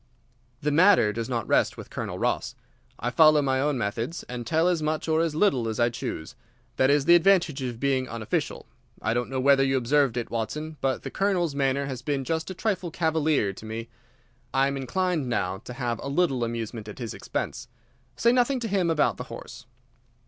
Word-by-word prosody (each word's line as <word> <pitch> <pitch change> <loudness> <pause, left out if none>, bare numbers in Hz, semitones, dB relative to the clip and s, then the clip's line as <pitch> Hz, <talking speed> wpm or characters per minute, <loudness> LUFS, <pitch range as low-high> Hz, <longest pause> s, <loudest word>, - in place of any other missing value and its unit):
"The 150 - +1
matter 165 - +5
does 115 +2 -4
not 115 -4 -2
rest - - +2
with - - -10
Colonel - - -4
Ross. - - -1 0.4
I 120 - -2
follow 155 +1 +6
my 130 -1 +1
own 145 -1 +1
methods, 115 - -3
and 120 -2 -7
tell 160 +2 +2
as 175 -3 +1
much 155 +1 -1
or 160 0 +2
as 165 -2 -1
little 140 - +2
as 110 0 -3
I 120 0 +4
choose. 80 -8 -5 0.4
That 130 - +4
is 140 -1 +3
the 170 - +7
advantage 175 -5 +4
of 120 -3 -4
being 130 -1 0
unofficial. 115 -2 -3 0.3
I 110 - 0
don't 120 0 -1
know 130 0 -2
whether 135 +1 +5
you 135 0 +2
observed 130 0 +2
it, 120 - -3
Watson, 150 +7 -4
but 135 -1 -1
the - - -5
Colonel's 185 -6 0
manner 140 0 0
has 130 -3 -5
been 140 0 -1
just 160 +4 -2
a 185 - -6
trifle 190 -3 -1
cavalier 160 - +1
to 95 - -12
me. 115 +1 -5 0.7
I 135 0 +4
am 140 0 -1
inclined 155 +1 -1
now 95 -5 -1
to 125 - -9
have 120 -3 -2
a - - -6
little 140 -5 +1
amusement 115 -1 -4
at 105 - -8
his 120 -5 -5
expense. 125 +2 -4 0.5
Say 235 - +3
nothing 250 +2 +2
to 230 - -2
him 190 -4 +1
about 160 -2 +2
the - - -6
horse." - - -10
135 Hz, 205 wpm, -26 LUFS, 120-160 Hz, 0.7 s, the